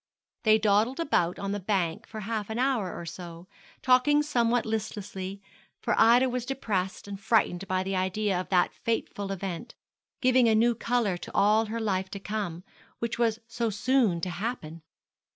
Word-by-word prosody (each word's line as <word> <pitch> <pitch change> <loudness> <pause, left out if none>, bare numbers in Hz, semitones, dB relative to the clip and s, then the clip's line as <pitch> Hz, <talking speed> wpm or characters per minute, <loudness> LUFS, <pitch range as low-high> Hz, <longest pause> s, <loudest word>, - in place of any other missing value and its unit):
They 215 -1 +5
dawdled 215 +5 +2
about 180 - +1
on 200 0 -3
the 205 - -2
bank 185 -4 -1
for 215 - -7
half 215 0 -3
an 220 - -3
hour 245 -7 +1
or 170 - -7
so, 170 +1 -9 0.4
talking 275 +3 +4
somewhat 245 -5 +1
listlessly, 200 -3 -4 0.4
for - - 0
Ida 240 +3 +6
was 250 -1 -2
depressed 210 -8 -3
and 200 -1 -6
frightened 195 -3 +1
by 185 0 0
the 195 0 -2
idea 190 +1 0
of - - -10
that 180 -2 +2
fateful 205 -3 -3
event, 195 +3 -5 0.4
giving 255 -2 +4
a 220 - +4
new 235 +2 +4
colour 230 -5 0
to - - -9
all 215 +2 +4
her 230 +2 -3
life 190 -4 -1
to 200 - -6
come, 195 -4 -4 0.3
which 235 0 -3
was 225 -2 +2
so 230 0 -1
soon 215 -3 +2
to 180 - -2
happen. 175 -5 -5
215 Hz, 170 wpm, -28 LUFS, 190-235 Hz, 0.4 s, Ida